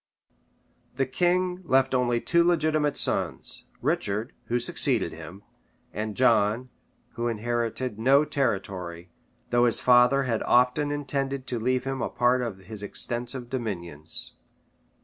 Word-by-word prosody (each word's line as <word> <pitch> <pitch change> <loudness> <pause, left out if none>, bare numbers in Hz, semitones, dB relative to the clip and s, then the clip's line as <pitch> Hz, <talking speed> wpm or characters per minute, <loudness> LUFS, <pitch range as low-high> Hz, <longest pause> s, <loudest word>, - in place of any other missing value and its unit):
This 135 0 -1
king 180 +4 +1
left 135 -4 +2
only 120 -2 +1
two 170 +7 +2
legitimate 155 -4 +1
sons, - - -1 0.2
Richard, 105 +3 -1
who 120 - 0
succeeded 120 - +2
him, 85 +5 -10 0.5
and 105 0 -4
John, 115 0 +2 0.4
who 120 +1 -3
inherited 120 0 -2
no 135 +5 +4
territory, 95 - -3 0.4
though 120 0 +4
his 120 - +6
father 125 +2 +5
had 115 -4 -1
often 125 +4 +2
intended 140 -2 -3
to 125 -3 -3
leave 125 +2 0
him 135 0 -3
a - - -1
part 125 +1 +2
of 115 -6 -4
his 100 +2 -7
extensive 120 +4 -4
dominions. 85 - -5
125 Hz, 130 wpm, -26 LUFS, 110-135 Hz, 0.5 s, his